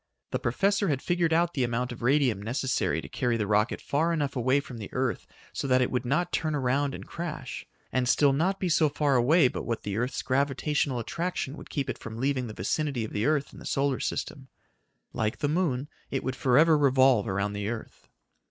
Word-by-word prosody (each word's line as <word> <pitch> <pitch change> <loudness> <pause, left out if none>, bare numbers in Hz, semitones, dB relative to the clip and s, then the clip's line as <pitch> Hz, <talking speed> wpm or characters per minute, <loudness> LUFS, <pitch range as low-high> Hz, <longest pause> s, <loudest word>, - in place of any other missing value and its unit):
The - - -1
professor 195 - +1
had 140 -5 +1
figured 175 +1 0
out 170 +1 +2
the 135 - 0
amount 120 +1 -1
of 120 - -8
radium 125 -5 +2
necessary 130 +4 -1
to - - -9
carry 120 -3 0
the 105 - -1
rocket 105 +2 +1
far 160 +4 0
enough 145 -4 -1
away 130 +2 +2
from 125 -4 -8
the 105 - -7
earth 125 -5 -1 0.3
so - - -3
that 130 -1 +4
it 125 - +1
would 125 0 -1
not 170 +8 0
turn 155 -1 0
around 140 +1 0
and - - -9
crash, 170 -2 -6 0.2
and 130 -1 +1
still 140 +1 +4
be 135 - 0
not 190 +4 +1
so 155 -1 +4
far 145 -1 +1
away 135 +5 +5
but - - -4
what 115 -1 -3
the 100 0 -3
earth's 125 +3 -2
gravitational 140 +1 0
attraction 155 +3 -3
would - - -11
keep 140 -3 -2
it - - -4
from 115 -1 -8
leaving 130 0 0
the 110 - -7
vicinity 135 - -1
of - - -9
the 105 +5 0
earth 150 -2 +1
and - - -12
the - - -10
solar 140 -1 0
system. 135 -3 -4 0.7
Like 110 -2 -1
the 145 - 0
moon, 145 -4 0 0.2
it 135 - -2
would 130 0 -2
forever 150 +5 +4
revolve 130 -5 +4
around 100 +1 -1
the 105 0 -3
earth. 115 -1 -7
135 Hz, 215 wpm, -28 LUFS, 120-150 Hz, 0.7 s, away